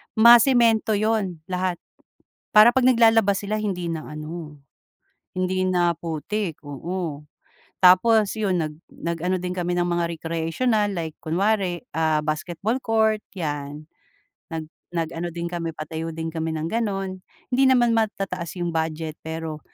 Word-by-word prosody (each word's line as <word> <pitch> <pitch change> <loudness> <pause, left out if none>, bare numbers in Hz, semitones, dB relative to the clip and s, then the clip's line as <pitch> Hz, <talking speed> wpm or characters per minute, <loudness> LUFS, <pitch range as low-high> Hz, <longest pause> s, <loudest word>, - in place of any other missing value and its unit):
masemento 235 -1 +6
'yun 205 -6 -1
lahat. 180 0 0 0.8
Para 215 +3 +7
'pag 260 - +3
naglalaba 225 -4 +5
sila 215 +1 -3
hindi 180 -4 -2
na 165 -2 -3
ano, 155 0 -7 0.8
hindi 185 0 0
na 175 -2 +2
putik, 170 +2 -4
oo. 150 +1 -5 0.6
Tapos 205 +4 +5
'yun, 190 -5 0
nag 155 -1 -4 0.2
nag 170 0 -4
ano 185 +1 +1
din 180 +1 -4
kami 180 -1 -1
ng 175 - 0
mga 175 0 0 0.2
recreational 200 +7 0
like 165 -4 -4
kunwari 185 +1 0 0.2
ah, 160 -1 +2
basketball 170 +8 -2
court 220 -1 +2
'yan, 150 -3 -5 0.7
nag 160 -1 -4 0.3
nag 165 -1 -1
ano 170 +1 -3
din 170 0 -4
kami 170 -2 -4
patayo 160 +1 -5
din 165 0 -3
kami 160 -1 -2
ng 160 +1 -3
gano'n. 195 -4 -2 0.4
Hindi 265 +2 +4
naman 240 -2 +4
matataas 195 -6 -2
'yung 175 -1 -1
budget 160 -1 -2
pero 160 -1 -5
175 Hz, 140 wpm, -23 LUFS, 160-215 Hz, 0.8 s, Para